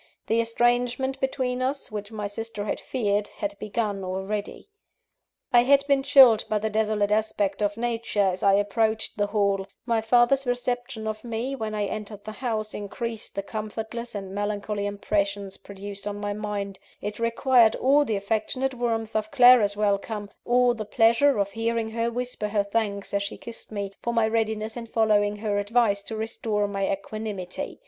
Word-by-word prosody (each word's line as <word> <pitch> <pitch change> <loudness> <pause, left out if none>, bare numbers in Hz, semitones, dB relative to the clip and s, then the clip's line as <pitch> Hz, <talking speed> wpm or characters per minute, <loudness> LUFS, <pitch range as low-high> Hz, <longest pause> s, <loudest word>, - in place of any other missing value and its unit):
The 230 +1 +2
estrangement 245 +3 +1
between 255 -1 -1
us, 270 0 -2
which 210 0 -5
my 210 -2 -4
sister 205 0 -5
had - - -2
feared, 205 -5 -1
had 205 -1 -5
begun 210 -2 -2
already. 195 - -4 0.8
I 240 - +8
had 280 +3 +4
been 280 -1 +3
chilled 270 -5 +7
by 215 - +2
the 215 +1 -2
desolate 210 -1 +1
aspect 210 -2 0
of 205 0 0
nature, 230 -3 0
as 185 -1 0
I 200 -1 +5
approached 220 +2 +1
the 205 - +2
Hall; 200 -2 +1 0.2
my 230 -2 +1
father's 245 +4 +3
reception 245 -1 -2
of 215 0 -4
me, 240 +3 -3
when 220 -4 -4
I 210 -1 0
entered 210 0 -6
the 215 - -6
house, 215 -2 -3
increased 225 +2 -5
the 200 - -2
comfortless 220 +2 -5
and 195 -1 -5
melancholy 205 0 -2
impressions 200 -1 -2
produced 200 0 -8
on 205 0 -3
my 205 0 -2
mind; 205 -2 -4 0.2
it 210 +2 -5
required 230 0 +4
all 280 +3 +4
the 225 -7 -1
affectionate 220 +6 -1
warmth 225 -3 -2
of 215 0 0
Clara's 245 -6 +6
welcome, 205 0 -1
all 245 0 +4
the 225 -2 -5
pleasure 230 +5 +4
of 200 -1 0
hearing 225 0 -1
her 230 +1 0
whisper 245 -2 -3
her 205 -1 +1
thanks, 200 -1 -2
as 200 - +1
she 200 - -4
kissed 235 -1 -10
me, 200 -2 -4
for 235 - -2
my 225 -1 +3
readiness 220 -1 -1
in 235 -1 -6
following 210 -2 +2
her 210 -1 -1
advice, 205 -1 +2
to 220 +2 -5
restore 220 -1 -1
my 195 -1 -1
equanimity. 200 -2 -5
215 Hz, 170 wpm, -26 LUFS, 205-235 Hz, 0.8 s, I